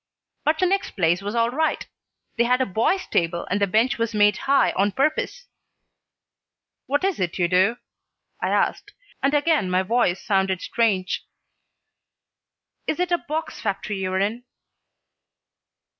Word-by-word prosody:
"But 310 +1 +2
the 370 - +2
next 390 +2 -1
place 175 0 +2
was 205 +3 -4
all 230 0 +2
right. 315 +4 0 0.5
They 235 - +2
had 250 +1 +2
a 260 - +2
boys' 240 - 0
table 170 0 -1
and 200 +2 0
the 200 - +3
bench 220 +5 +1
was 230 -1 -1
made 210 0 +4
high 280 - +4
on 200 +1 0
purpose." 310 - -1 1.4
"What 285 +6 0
is 385 -3 0
it 175 -2 -2
you 175 -2 +2
do?" 190 +6 +3 0.6
I - - 0
asked, - - 0 0.3
and 280 +2 +2
again 295 - +2
my 185 +1 +2
voice 195 -3 +1
sounded 190 -2 0
strange. 200 -6 0 1.6
"Is 310 - -1
it 360 0 0
a 345 - +2
box 310 +2 -5
factory 200 -1 -3
you're 185 0 -1
in?" 215 +5 -1
220 Hz, 150 wpm, -23 LUFS, 190-285 Hz, 1.6 s, made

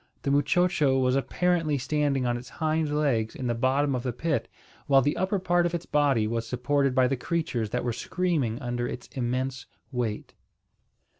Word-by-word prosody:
The 140 - 0
muchocho 150 -1 +3
was 130 0 +2
apparently 165 +1 +1
standing 140 0 0
on 120 0 +1
its 120 0 -7
hind 155 -1 -1
legs 120 -7 0
in 130 - -5
the 120 - +1
bottom 135 +4 +1
of 125 - -1
the 125 0 -2
pit, 150 +6 -1 0.4
while 135 -2 +5
the 145 - +1
upper 190 +3 0
part 175 -2 +2
of 175 - -3
its 170 - -4
body 140 -7 +2
was 115 +1 -2
supported 135 +2 0
by 130 -1 +4
the 135 - 0
creatures 145 - -2
that - - -2
were 120 -1 -1
screaming 145 -6 -1
under 120 0 -2
its 125 - -6
immense 130 +1 -2 0.2
weight. 120 -5 -3
135 Hz, 180 wpm, -27 LUFS, 120-155 Hz, 0.4 s, while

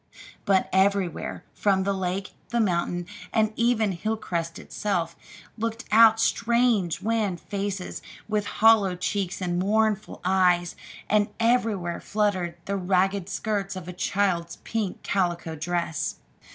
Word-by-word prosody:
But 195 -1 +3
everywhere, 190 -2 +1
from 195 -2 +2
the 200 +1 0
lake, 190 +1 -3 0.2
the 235 - 0
mountain, 175 -3 0 0.3
and 215 -1 +2
even 230 -3 +2
from 180 - -5
Hilcrest 175 -6 -2
itself, 175 -5 -2 0.4
looked 225 0 -3
out 225 0 +7
strange 230 -6 +2
wan 215 -5 0
faces 200 0 -4 0.3
with 210 -1 -1 0.2
hollow 215 -5 +6
cheeks 190 +1 -2
and 175 -1 -1
mournful 215 +2 +1
eyes; 180 -2 +3 0.3
and 210 -1 +3
everywhere 225 -7 +1
fluttered 190 -5 -1
the 200 0 -1
ragged 190 +1 +1
skirts 200 -1 -2
of 185 -2 -7
a 180 - -6
child's 175 -2 0
pink 220 -5 -3
calico 175 -4 -1
dress. 170 0 -2
195 Hz, 125 wpm, -26 LUFS, 180-215 Hz, 0.4 s, out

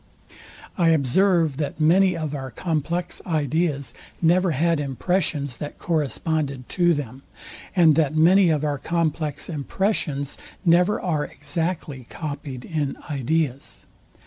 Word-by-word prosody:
I 170 - +4
observe, 165 +1 +3
that 150 0 -3
many 180 +3 +4
of 155 -3 -3
our 135 -2 -5
complex 165 - -2
ideas 150 -4 -1 0.3
never 180 +2 +3
had 165 +2 +1
impressions, 140 -2 -1
that 150 - -6
corresponded 150 -4 -1
to 175 -2 +3
them, 135 -2 -6 0.5
and 165 -4 +6
that 155 -1 +1
many 175 +4 +5
of 155 -2 +1
our 145 -2 -1
complex 160 -3 -1
impressions 150 -2 -1 0.3
never 180 +4 +4
are 155 -5 -1
exactly 145 -3 -4
copied 145 -5 -6
in 150 -4 -2
ideas. 140 0 -2
155 Hz, 120 wpm, -23 LUFS, 140-170 Hz, 0.5 s, and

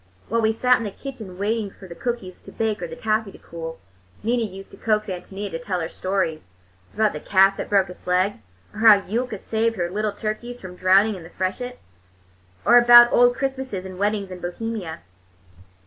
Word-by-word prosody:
While 230 +1 +1
we 220 0 +3
sat 250 +3 +3
in - - -4
the - - -2
kitchen 220 -5 -9
waiting 210 +1 -1
for 190 0 -14
the 170 - -8
cookies 195 -1 -5
to - - -12
bake 220 -1 -2
or - - -3
the - - -8
taffy 215 -1 -1
to - - -12
cool, 165 -1 -8 0.5
Nina 235 +2 +1
used 195 -3 -6
to 195 - -13
coax 215 0 +1
Ántonia 195 +2 -6
to 165 - -4
tell 180 +2 -3
her 160 - -3
stories—about 155 - -3
the 150 - -5
calf 195 +3 +4
that - - -5
broke 195 -2 +3
its 180 - -13
leg, 185 - +1 0.3
or 210 - -9
how 215 -3 +7
Yulka 235 +1 -2
saved 225 +3 -1
her 175 -3 -2
little 210 +2 -1
turkeys 225 +4 -5
from 185 -1 -9
drowning 195 +4 +4
in 190 - -8
the 165 - -11
freshet, 245 +8 -3 0.9
or 240 +1 +8
about 240 0 +8
old 245 0 +5
Christmases 265 -8 -3
and 185 -1 -8
weddings 205 -1 -1
in 180 - -7
Bohemia. 180 - -5
205 Hz, 195 wpm, -23 LUFS, 185-225 Hz, 0.9 s, or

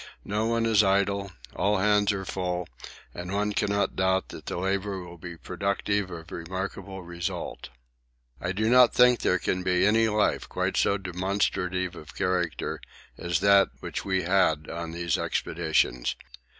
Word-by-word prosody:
No 105 +2 0
one 115 0 +1
is 110 -2 +5
idle 100 0 +1 0.2
all 105 +1 +2
hands 105 +1 +3
are 95 -1 -4
full, 90 -2 -3 0.5
and 90 +1 -6
one 105 +1 0
cannot 100 0 0
doubt 95 0 +1
that - - -10
the - - -3
labour 95 +1 -1
will 85 -1 -10
be 85 0 -8
productive 100 +2 -1
of 85 -1 -9
remarkable 95 +2 -5
result. 85 0 -5 0.7
I 90 - -2
do 110 +3 0
not 125 0 +6
think 125 -1 +6
there 90 - +2
can 90 +1 -1
be 90 0 +2
any 110 +2 +4
life 105 -1 +1
quite - - -1
so 100 - +2
demonstrative 95 -1 -1
of 75 - -11
character 90 -2 -1 0.3
as 85 +1 -1
that 100 0 +6
which - - -4
we 95 -1 0
had 85 -4 +2
on 85 0 -5
these 85 0 -1
expeditions. 80 -7 0
95 Hz, 155 wpm, -27 LUFS, 90-100 Hz, 0.7 s, not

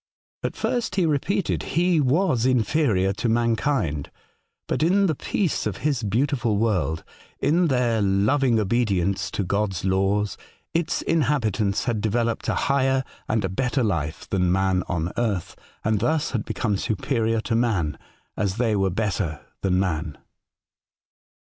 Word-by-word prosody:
At - - -3
first, 235 -5 -1
he 185 -3 +2
repeated, 165 +6 0 0.2
he 175 -1 +3
was 145 -2 +2
inferior 115 -6 +2
to 115 +4 -1
mankind; 115 - 0 0.6
but - - -1
in 190 +5 +4
the 165 - +2
peace 165 - -1
of 100 -3 -4
his 140 -5 +1
beautiful 120 0 0
world, 95 -7 0 0.4
in 170 +4 +3
their 125 -5 +1
loving 110 +6 +2
obedience 100 -4 0
to 100 - -2
God's 95 -1 -1
laws, 95 +1 +1 0.4
its 165 0 0
inhabitants 115 - +1
had 115 -5 -1
developed 115 +2 0
a - - +1
higher 135 -1 +2 0.3
and 110 -2 +1
a - - -1
better 125 +6 0
life 80 -7 -2
than 90 -3 +1
man 95 0 +2
on 85 0 -1
earth, 105 -7 -1 0.3
and 110 -1 +1
thus 155 +7 0
had 115 -4 -2
become 105 -4 -1
superior 115 +2 0
to 115 - -2
man, 105 - 0 0.4
as 100 -3 -1
they 115 -3 +1
were 95 -1 +2
better 95 -5 -2 0.2
than 90 -1 +2
man. 80 -5 -2
110 Hz, 140 wpm, -24 LUFS, 95-135 Hz, 0.6 s, in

